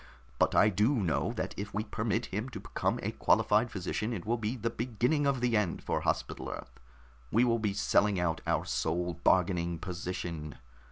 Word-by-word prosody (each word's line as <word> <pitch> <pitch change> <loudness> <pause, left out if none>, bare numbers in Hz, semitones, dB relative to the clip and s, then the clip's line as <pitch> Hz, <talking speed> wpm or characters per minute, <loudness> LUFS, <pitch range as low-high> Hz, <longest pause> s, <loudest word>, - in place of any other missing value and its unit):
But - - +3
I 105 - +6
do 105 +8 +2
know 95 -9 0
that - - -3
if 100 0 -5
we 105 - 0
permit 110 +1 -1
him 110 +6 -2
to 130 - -7
become - - -1
a - - -1
qualified 110 +3 +3
physician, 105 +4 -2
it 95 -6 -5
will 115 +2 0
be 110 +3 -2
the 115 -1 -2
beginning 125 +6 0
of 135 -3 +1
the 120 -2 +2
end 105 -5 0
for - - -1
Hospital - - -2
Earth. - - -8 0.5
We 115 +3 +4
will 115 -2 +2
be 105 -3 0
selling 105 -2 +3
out 85 -2 0
our - - +1
sole 85 +2 -1
bargaining 85 -2 +2
position. 85 -3 -5
105 Hz, 185 wpm, -31 LUFS, 90-115 Hz, 0.5 s, I